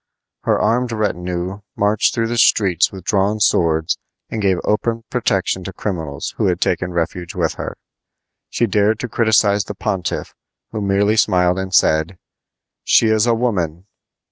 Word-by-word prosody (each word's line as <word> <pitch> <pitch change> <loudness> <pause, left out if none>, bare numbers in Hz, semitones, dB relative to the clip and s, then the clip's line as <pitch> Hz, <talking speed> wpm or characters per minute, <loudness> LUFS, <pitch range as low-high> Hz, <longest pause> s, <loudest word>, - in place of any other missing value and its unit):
Her - - +2
armed 120 +1 +1
retinue 90 -3 -3
marched 105 +1 +1
through 115 - +1
the 120 0 -1
streets 95 -7 +3
with 95 -2 -9
drawn 100 +2 +1
swords 80 -5 +2 0.3
and 110 - -3
gave 95 -2 +2
open 115 +2 -1
protection 95 -6 0
to 95 - -6
criminals 80 -7 -4
who - - +1
had 90 -2 0
taken 90 0 0
refuge 85 0 -3
with - - 0
her. - - -6 0.7
She 120 - +1
dared 105 0 +2
to - - -3
criticize 110 -3 +2
the 105 - -6
pontiff, 95 -3 -3 0.4
who 110 - -4
merely 100 +2 +2
smiled 90 -3 +3
and 95 0 -4
said: 80 0 +2 0.7
"She 110 - +4
is 110 +1 +3
a 115 - +3
woman!" 90 -8 -2
100 Hz, 155 wpm, -19 LUFS, 90-110 Hz, 0.7 s, She